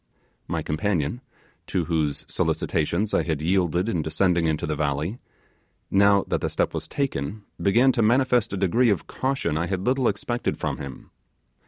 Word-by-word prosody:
My -, -, -2 dB
companion 80 Hz, -, -1 dB, 0.5 s
to 90 Hz, -, -1 dB
whose 75 Hz, -3 st, -1 dB
solicitations 85 Hz, +7 st, 0 dB
I -, -, +3 dB
had 80 Hz, -3 st, -2 dB
yielded 90 Hz, +2 st, +1 dB
in 90 Hz, -8 st, 0 dB
descending 85 Hz, +1 st, +1 dB
into 80 Hz, -1 st, 0 dB
the 75 Hz, +1 st, -2 dB
valley 75 Hz, -, -1 dB, 0.7 s
now 100 Hz, 0 st, +5 dB
that -, -, -1 dB
the -, -, -1 dB
step -, -, 0 dB
was -, -, -4 dB
taken, 110 Hz, -, -3 dB, 0.2 s
began 120 Hz, +7 st, +4 dB
to 120 Hz, -, 0 dB
manifest 125 Hz, 0 st, +3 dB
a 100 Hz, -, -2 dB
degree 105 Hz, +6 st, +3 dB
of 100 Hz, -6 st, 0 dB
caution 130 Hz, -, -1 dB
I 85 Hz, +2 st, -1 dB
had 95 Hz, 0 st, -2 dB
little 130 Hz, -1 st, +2 dB
expected 120 Hz, +4 st, -1 dB
from -, -, -2 dB
him. 70 Hz, -2 st, -9 dB
95 Hz, 165 wpm, -25 LUFS, 80-115 Hz, 0.7 s, now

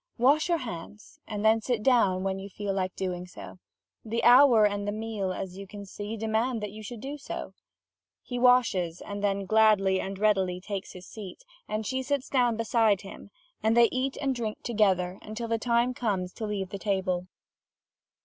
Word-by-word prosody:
Wash 285 Hz, +7 st, +3 dB
your 340 Hz, -, +3 dB
hands, 210 Hz, -, -8 dB
and 210 Hz, -1 st, -3 dB
then 220 Hz, +1 st, +5 dB
sit 235 Hz, -2 st, -1 dB
down, 200 Hz, -8 st, +3 dB
when 195 Hz, 0 st, -1 dB
you 195 Hz, +1 st, -8 dB
feel 200 Hz, 0 st, -3 dB
like 185 Hz, -1 st, -2 dB
doing 180 Hz, -1 st, -3 dB
so. 180 Hz, -, -11 dB, 0.4 s
The 230 Hz, +1 st, -2 dB
hour 245 Hz, -3 st, +7 dB
and 205 Hz, 0 st, -1 dB
the -, -, 0 dB
meal, 215 Hz, -3 st, -3 dB
as 185 Hz, 0 st, -6 dB
you 200 Hz, -, -8 dB
can 200 Hz, +1 st, -9 dB
see, 205 Hz, +3 st, -6 dB
demand 225 Hz, +3 st, 0 dB
that 210 Hz, -, -4 dB
you 215 Hz, +1 st, -9 dB
should 215 Hz, +1 st, -8 dB
do 285 Hz, +2 st, -6 dB
so." -, -, -6 dB, 0.7 s
He 245 Hz, -1 st, -4 dB
washes, 225 Hz, -9 st, +3 dB
and 205 Hz, 0 st, -6 dB
then 200 Hz, -1 st, 0 dB
gladly 205 Hz, -2 st, +4 dB
and 195 Hz, 0 st, -5 dB
readily 190 Hz, -3 st, +1 dB
takes 195 Hz, 0 st, -6 dB
his 180 Hz, 0 st, -11 dB
seat, 215 Hz, -, -10 dB, 0.2 s
and 215 Hz, 0 st, -3 dB
she 260 Hz, +4 st, -1 dB
sits 275 Hz, 0 st, -2 dB
down 245 Hz, -4 st, +2 dB
beside 225 Hz, -3 st, +2 dB
him, 195 Hz, 0 st, -11 dB, 0.3 s
and 220 Hz, +2 st, +2 dB
they 235 Hz, -1 st, +7 dB
eat 260 Hz, +1 st, -1 dB
and 275 Hz, -2 st, 0 dB
drink 225 Hz, -4 st, -4 dB
together, 190 Hz, -5 st, +1 dB
until 220 Hz, +2 st, -5 dB
the 230 Hz, 0 st, 0 dB
time 240 Hz, +2 st, +2 dB
comes 195 Hz, -7 st, -2 dB
to 220 Hz, -, -5 dB
leave 195 Hz, -3 st, -3 dB
the 200 Hz, -, -6 dB
table. 185 Hz, -3 st, -1 dB
215 Hz, 190 wpm, -28 LUFS, 195-235 Hz, 0.7 s, hour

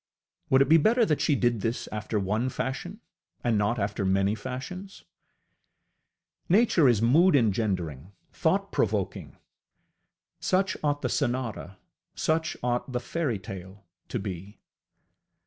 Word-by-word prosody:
Would 130 Hz, +1 st, +6 dB
it 135 Hz, -, -6 dB
be 165 Hz, -, +8 dB
better 225 Hz, +9 st, +4 dB
that 150 Hz, -7 st, 0 dB
she 145 Hz, -, +3 dB
did 120 Hz, -4 st, +1 dB
this 115 Hz, +3 st, -2 dB
after 105 Hz, 0 st, -2 dB
one 105 Hz, +6 st, 0 dB
fashion 175 Hz, -, -4 dB, 0.4 s
and 120 Hz, -2 st, +2 dB
not 105 Hz, +3 st, +1 dB
after 100 Hz, -1 st, -2 dB
many 95 Hz, +1 st, +2 dB
fashions? 130 Hz, -, -7 dB, 1.5 s
Nature 185 Hz, -, +5 dB
is 115 Hz, -2 st, +2 dB
mood 155 Hz, +8 st, +5 dB
engendering, 95 Hz, -, 0 dB, 0.2 s
thought -, -, 0 dB
provoking: -, -, -1 dB, 1.0 s
such 190 Hz, +1 st, +1 dB
ought 145 Hz, -1 st, 0 dB
the -, -, 0 dB
sonata, 120 Hz, -, -2 dB, 0.4 s
such 160 Hz, +1 st, 0 dB
ought 125 Hz, +1 st, -1 dB
the 125 Hz, -, -1 dB
fairytale 100 Hz, -, -5 dB, 0.2 s
to -, -, -3 dB
be. 100 Hz, -1 st, -6 dB
120 Hz, 125 wpm, -27 LUFS, 100-150 Hz, 1.5 s, be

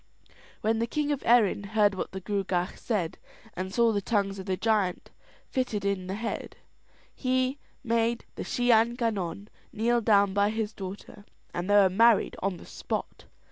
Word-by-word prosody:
When 220 Hz, +1 st, +1 dB
the 230 Hz, -, 0 dB
king 295 Hz, +4 st, -1 dB
of 285 Hz, -, -1 dB
Erin 225 Hz, -4 st, +4 dB
heard 205 Hz, 0 st, +2 dB
what 185 Hz, -, -4 dB
the 190 Hz, 0 st, -6 dB
Gruagach 190 Hz, -2 st, -1 dB
said, 195 Hz, -9 st, -2 dB, 0.3 s
and 185 Hz, +1 st, -4 dB
saw 235 Hz, +2 st, +3 dB
the 205 Hz, -2 st, 0 dB
tongues 200 Hz, -2 st, 0 dB
of 190 Hz, -, -8 dB
the 185 Hz, -1 st, 0 dB
giant 210 Hz, -5 st, 0 dB, 0.4 s
fitted 230 Hz, -6 st, -2 dB
in 195 Hz, -2 st, -1 dB
the 190 Hz, -, -3 dB
head, 225 Hz, +2 st, -4 dB, 0.6 s
he 255 Hz, +1 st, 0 dB, 0.2 s
made 230 Hz, 0 st, 0 dB
the -, -, -5 dB
Shee 245 Hz, 0 st, +1 dB
an 230 Hz, +1 st, +4 dB
Gannon 205 Hz, -5 st, -2 dB, 0.2 s
kneel 235 Hz, +2 st, +1 dB
down 200 Hz, -3 st, +4 dB
by 200 Hz, +1 st, +3 dB
his 220 Hz, -1 st, -2 dB
daughter, 200 Hz, +1 st, -8 dB, 0.3 s
and 175 Hz, +3 st, -3 dB
they 205 Hz, -, +5 dB
were 200 Hz, -2 st, +7 dB
married 225 Hz, +4 st, +4 dB
on 195 Hz, -1 st, -1 dB
the -, -, -13 dB
spot. -, -, -5 dB
210 Hz, 175 wpm, -28 LUFS, 195-230 Hz, 0.6 s, were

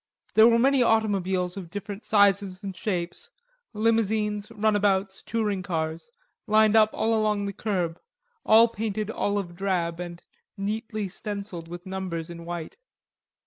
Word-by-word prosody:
There 220 Hz, +1 st, +8 dB
were 230 Hz, -1 st, +5 dB
many 270 Hz, +2 st, +4 dB
automobiles 195 Hz, -5 st, +1 dB
of 180 Hz, -4 st, -7 dB
different 205 Hz, +2 st, -7 dB
sizes 200 Hz, -2 st, +3 dB
and 195 Hz, -2 st, -5 dB
shapes, 175 Hz, -2 st, -3 dB, 0.4 s
limousines, 215 Hz, -2 st, 0 dB
runabouts, 205 Hz, -3 st, +1 dB
touring 210 Hz, -4 st, -1 dB
cars, 165 Hz, +1 st, -3 dB, 0.4 s
lined 215 Hz, 0 st, +4 dB
up 215 Hz, -1 st, +6 dB
along 215 Hz, -2 st, +1 dB
the 200 Hz, -, -3 dB
curb, 180 Hz, -6 st, -2 dB, 0.4 s
all 225 Hz, +2 st, +7 dB
painted 215 Hz, -1 st, -3 dB
olive 200 Hz, -5 st, -2 dB
drab 175 Hz, -3 st, -1 dB
and 175 Hz, -1 st, -7 dB, 0.3 s
neatly 215 Hz, +1 st, -3 dB
stenciled 195 Hz, -3 st, -5 dB
with 175 Hz, +2 st, -9 dB
numbers 185 Hz, -3 st, -4 dB
in 170 Hz, 0 st, -9 dB
white. 170 Hz, -2 st, -6 dB
200 Hz, 130 wpm, -26 LUFS, 180-215 Hz, 0.4 s, There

